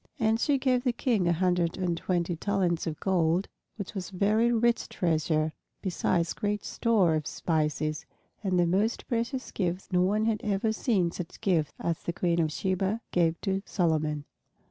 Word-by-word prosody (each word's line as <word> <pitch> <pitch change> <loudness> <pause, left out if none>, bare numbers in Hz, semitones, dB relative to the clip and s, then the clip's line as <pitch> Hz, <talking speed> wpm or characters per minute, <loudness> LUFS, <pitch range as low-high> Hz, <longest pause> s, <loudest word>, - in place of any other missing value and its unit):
And 225 -1 +2
she 285 +3 +2
gave 255 -2 +1
the 250 - +2
King 230 -7 +1
a - - +4
hundred 175 -1 +1
and 180 -2 0
twenty 175 0 -1
talents 180 -2 0
of 155 -2 -4
gold, 180 -1 +1 0.3
which 200 -2 -6
was 190 -1 -5
a - - -10
very 215 +5 +3
rich 235 0 +2
treasure, 155 -2 0 0.3
besides 175 -2 0
great 205 0 -2
store 210 -8 +2
of 155 -2 -1
spices, 155 -2 -1 0.4
and 185 -3 +1
the 175 - +4
most 200 +7 0
precious 240 +2 -2
gifts; 180 -1 -2
no 180 -1 +3
one 210 +4 +2
had 220 -2 0
ever 210 +1 +1
seen 205 -7 +1
such 175 -1 -7
gifts 170 -9 +1
as 170 -1 -2
the 170 - -3
Queen 170 0 +1
of 155 -1 0
Sheba 190 +6 -1
gave 170 -2 +2
to 195 -1 -1
Solomon. 155 -5 0
185 Hz, 175 wpm, -28 LUFS, 165-215 Hz, 0.4 s, a